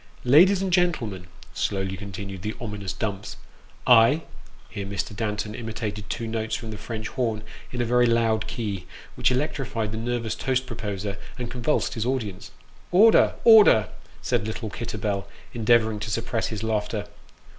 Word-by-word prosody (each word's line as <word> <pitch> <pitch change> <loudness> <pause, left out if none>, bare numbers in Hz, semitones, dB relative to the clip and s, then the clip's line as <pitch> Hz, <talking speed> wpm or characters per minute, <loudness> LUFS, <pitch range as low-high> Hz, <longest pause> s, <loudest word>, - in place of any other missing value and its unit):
" - - -22 0.2
Ladies 190 +2 +5
and 190 -2 -1
gentlemen," 120 - 0 0.3
slowly 95 -1 -1
continued 100 0 -7
the 105 +3 -4
ominous 105 -5 -4
Dumps, 100 +2 -4 0.3
" - - -28 0.2
I 155 +5 0 0.2
" 80 +4 -25
(here 100 -3 -5
Mr. 100 +1 -4
Danton 105 0 -2
imitated 110 -2 -5
two 115 - -3
notes 110 -1 -2
from 110 -1 -6
the 105 - -7
French 110 0 -5
horn, 115 -5 -2 0.3
in 125 - -2
a - - +1
very 120 +1 +4
loud 115 -2 +2
key, 100 -7 -4 0.3
which - - +2
electrified 125 -5 -1
the 110 - -4
nervous 115 -1 -2
toast 130 -1 -1
proposer, 105 -4 -4 0.2
and 120 -2 -5
con 125 - -6
vulsed 150 +6 +1
his 115 -1 -2
audience). 110 -8 -3 0.2
" - - -28
Order 215 +5 +6
1 225 -1 +9
order! 110 - +6 0.2
" - - -25
said 105 - 0
little 110 -1 -4
Kitterbell, 105 -4 -3 0.3
endeavouring 110 -1 +3
to 110 - -4
suppress 115 +1 -1
his 110 -1 -5
laughter. 105 -1 -1
110 Hz, 175 wpm, -25 LUFS, 105-120 Hz, 0.3 s, 1